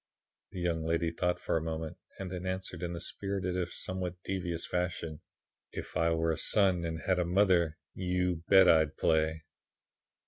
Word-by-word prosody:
"The 95 - -7
young 85 -2 0
lady 80 +1 0
thought 90 +1 0
for - - -1
a - - -1
moment 80 -1 -4 0.2
and 95 -2 -5
then 90 -1 -4
answered 95 -2 -3
in 85 0 -3
this 85 +1 -3
spirited, 95 -2 -2
if 90 -2 -2
somewhat 95 -1 -3
devious, 90 -3 -2
fashion: 85 -3 -3 0.5
"'If - - -7
I 85 0 +2
were 80 0 +1
a 80 - -1
son 95 -4 +3
and 80 -1 -3
had 95 -1 +2
a - - +3
mother, 85 -3 +3 0.2
_you 90 -2 0
bet 95 -1 +7
I'd 80 -2 +4
play! 80 0 +1
85 Hz, 175 wpm, -31 LUFS, 80-90 Hz, 0.5 s, bet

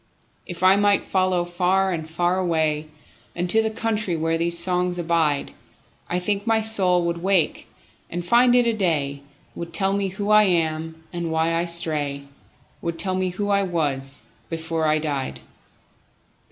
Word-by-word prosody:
If 175 -1 -6
I 190 +1 +6
might 205 0 +3
follow 185 -2 +1
far 185 +2 +1
and 160 -3 -4
far 175 +3 0
awayUnto 160 +3 -1
the 220 - 0
country 215 -5 -1
where 165 +1 0
these 170 +1 0
songs 180 0 +1
abide,I 165 +1 -3
think 200 +3 -2
my 225 -1 +3
soul 190 -5 +2
would 170 0 -2
wake 185 -3 0 0.4
and 175 0 -4
find 240 +5 +5
it 235 -3 +2
day, 145 -6 0 0.3
Would 170 -1 -7
tell 195 +3 +1
me 200 0 0
who 200 +2 -3
I 210 0 +7
am, 160 -2 -1
and 170 -1 -3
why 160 +1 +1
I 165 +1 0
stray,—Would 155 0 -3
tell 185 +2 -1
me 185 0 0
who 205 +3 -3
I 200 0 +3
was 145 -7 -2 0.3
before 165 -1 -2
I 155 0 +3
died. 145 -4 -3
175 Hz, 150 wpm, -23 LUFS, 160-190 Hz, 0.4 s, I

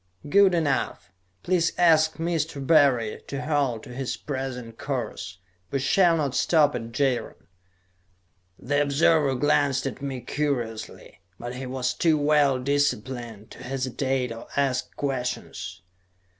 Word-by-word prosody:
"Good 195 +3 +5
enough. 140 - -1 0.3
Please 175 -2 +1
ask 160 -2 +4
Mr. 160 -4 -2
Barry 135 -8 +3
to 140 +1 -4
hold 140 -7 0
to 125 - -10
his 130 0 -3
present 130 -5 -5
course. 110 -8 -4 0.3
We 140 - -1
shall 170 +5 +3
not 140 -4 -1
stop 150 +2 +3
at 115 0 -5
Jaron." 125 - -1 1.1
The 145 +3 0
observer 145 -1 +3
glanced 140 0 +2
at 135 - -4
me 135 -3 -4
curiously, 120 -4 -4 0.2
but 120 +1 -6
he 130 +1 -6
was 130 0 -1
too 160 -2 +2
well 145 -2 +3
disciplined 125 -5 -2
to - - -12
hesitate 130 -1 -2
or 115 - -8
ask 135 -2 +1
questions. 125 -8 -4
135 Hz, 130 wpm, -25 LUFS, 125-150 Hz, 1.1 s, Good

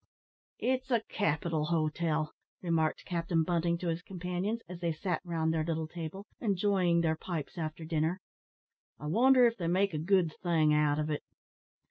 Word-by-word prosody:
"It's 260 +1 0
a 235 -3 +2
capital 160 -4 0
hotel," 155 -1 0 0.3
remarked 160 -3 0
Captain 170 -1 0
Bunting 170 0 +1
to 175 - -4
his 165 +1 -2
companions, 180 +5 -3
as 180 0 -8
they 170 -1 0
sat 180 +2 -2
round 165 -2 0
their 160 -1 +1
little 160 -1 -2
table, 170 +4 -6
enjoying 190 -4 +2
their 160 -1 +2
pipes 160 -2 -5
after 160 -1 -4
dinner; 160 +3 0 0.8
"I 150 - -8
wonder 250 - +5
if 235 0 +2
they 170 -4 -2
make 190 +2 +2
a 155 - -1
good 170 -1 +2
thing 160 -4 +3
out 150 -1 +3
of 155 0 -1
it?" 150 - -1
170 Hz, 165 wpm, -31 LUFS, 160-185 Hz, 0.8 s, wonder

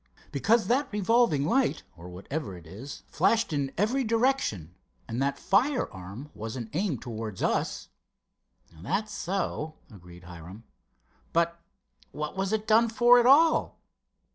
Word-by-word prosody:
"Because 220 - +2
that 275 +4 +1
revolving 210 - +2
light, 255 - +1
or 85 +1 -11
whatever 100 - -5
it 85 - -14
is, 110 - -9
flashed 225 -7 +1
in 140 -2 -1
every 235 +8 +1
direction, 225 - 0 0.3
and 115 +2 -3
that 140 +1 0
firearm 150 - -1
wasn't 115 +2 -6
aimed 170 - -1
towards 110 -4 -5
us." - - -1 0.9
"That's 200 - -2
so," 165 -5 -3 0.2
agreed 90 -3 -14
Hiram. 90 +4 -11 0.7
"But 170 0 +1 0.5
what 150 +3 -5
was 195 0 -1
it 215 -1 -1
done 230 +1 +4
for 240 +2 +6
at 240 - +3
all?" 315 +5 +4
160 Hz, 130 wpm, -28 LUFS, -, 0.9 s, for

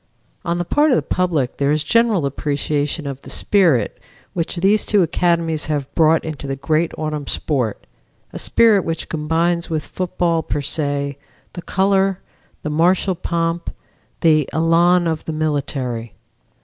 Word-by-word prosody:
On 170 0 -1
the 175 - -2
part 295 - +3
of 260 - +4
the - - +1
public 165 -9 -1
there 140 0 +1
is 150 0 +1
general 230 -9 +2
appreciation 145 +2 -1
of 140 -1 -5
the - - -12
spirit 165 - +2 0.3
which 170 0 -2
these 195 +4 +2
two 205 -3 +3
academies 165 -2 0
have 145 -3 -3
brought 160 0 +3
into 155 -3 -5
the 135 - -2
great 155 +4 0
autumn 150 -2 -3
sport, 125 -8 -2 0.5
a - - -5
spirit 220 -5 +4
which 165 -1 -4
combines 165 +2 0
with 155 -2 -2
football 175 -2 -1
per 145 - -3
se 140 -1 -2 0.3
the 175 - -6
color, 195 +1 +1 0.4
the 150 - -2
martial 180 +5 +2
pomp, 170 -1 -2 0.5
the 155 -4 +3
elan 170 +2 +3
of 160 -2 -2
the 160 - -3
military. 135 -7 -2
160 Hz, 150 wpm, -20 LUFS, 145-175 Hz, 0.5 s, of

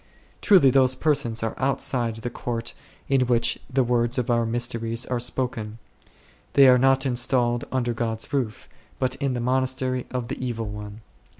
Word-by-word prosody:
Truly 180 - +6
those 130 0 +4
persons 120 -7 0
are 110 - -2
outside 130 -3 0
the 115 +2 -6
Court 120 -1 -4 0.3
in 135 -2 +2
which 120 -1 +1
the 135 -1 +2
words 120 0 0
of 125 -1 0
our 115 -1 +1
mysteries 115 0 -2
are 125 -1 -2
spoken; 120 -3 -2 0.8
they 140 -1 +7
are 125 -1 +6
not 135 +1 +3
installed 120 -1 +1
under 120 -2 0
God's 115 +1 -4
roof, 125 -6 -2 0.3
but 130 -1 -1
in 135 -2 -1
the - - -2
monastery 130 0 -1
of 125 -2 -4
the - - -5
Evil 115 -3 -3
One. 105 +1 -8
120 Hz, 165 wpm, -24 LUFS, 115-130 Hz, 0.8 s, they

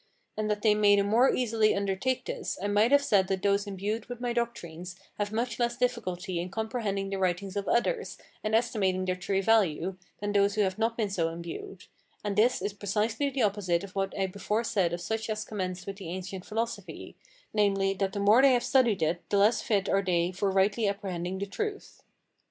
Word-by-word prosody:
And 215 0 -2
that 210 0 -1
they 215 -2 +5
may 205 -1 +5
the 200 - +3
more 230 +6 +4
easily 225 -3 +2
undertake 200 +6 -1
this, - - -4
I 195 - -4
might 205 +4 +3
have 285 0 +5
said 200 -8 +3
that 190 -1 -2
those 200 0 +2
imbued 200 +3 -3
with 245 -1 -7
my 245 -1 -2
doctrines 180 -7 -4 0.2
have 205 0 -1
much 230 +1 -2
less 240 0 0
difficulty 195 -8 -2
in 175 +2 -3
comprehending 210 -2 -2
the 195 - -2
writings 185 +1 -1
of 200 -1 -2
others, 455 - 0 0.3
and 215 +1 +1
estimating 195 -5 +1
their 185 0 0
true 195 +2 -1
value, 190 -4 +2 0.2
than 205 0 -2
those 200 0 +3
who 215 - +2
have 190 +1 0
not 230 +1 0
been 215 -4 -1
so 165 -4 0
imbued; 170 +3 -8 0.4
and 205 -1 -2
this 225 0 +3
is 200 0 -2
precisely 210 +7 -1
the 265 -3 -1
opposite 195 -4 +1
of 200 - -9
what 195 0 -2
I 195 - +1
before 200 +4 -2
said 190 -7 +1
of 175 0 -4
such 220 +4 -3
as 215 0 -2
commenced 185 -3 -4
with 195 -1 -6
the 190 -5 -7
ancient 185 +1 -6
philosophy, 230 +2 -4 0.4
namely, 195 -2 +2
that 195 0 -2
the 205 - -3
more 210 +5 +6
they 270 -1 +6
have 240 -1 +2
studied 245 -7 +3
it 165 +2 0
the 200 - +2
less 210 +3 +4
fit 200 -3 0
are 195 - +2
they 175 -2 +1
for 195 +2 -1
rightly 200 +3 +2
apprehending 190 -2 -3
the 200 - -2
truth. 410 - -5
200 Hz, 210 wpm, -29 LUFS, 190-225 Hz, 0.4 s, more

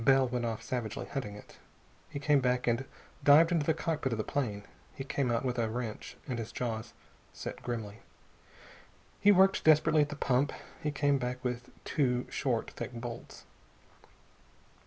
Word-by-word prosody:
Bell 135 +1 +5
went 120 -1 -2
off 115 -1 -3
savagely, 115 -1 -3
hunting 125 -7 -4
it. 105 - -14 0.5
He - - -6
came 145 0 +3
back 125 0 +1
and 120 +2 +1 0.4
dived 155 +4 +7
into 160 -4 +1
the 160 - +3
cockpit 155 -5 -1
of 115 - -1
the 110 - -1
plane. 105 -8 -2 0.3
He 135 - -5
came 135 -1 -1
out 115 +2 0
with 125 -1 -1
a 115 -1 +1
wrench, 120 +1 -5
and 125 -3 -2
his 115 - -5
jaws 110 -3 -4 0.4
set - - -6
grimly. 110 -3 -4 1.2
He 205 - +6
worked 195 0 +5
desperately 155 0 +5
at 145 - +1
the 150 - -5
pump. 135 0 +1 0.3
He 150 - 0
came 145 -1 +2
back 125 0 -3
with 125 -1 -3 0.2
two 125 -4 +1
short, 120 -4 -1
thick - - -6
bolts. 120 0 -7
125 Hz, 170 wpm, -31 LUFS, 115-145 Hz, 1.2 s, dived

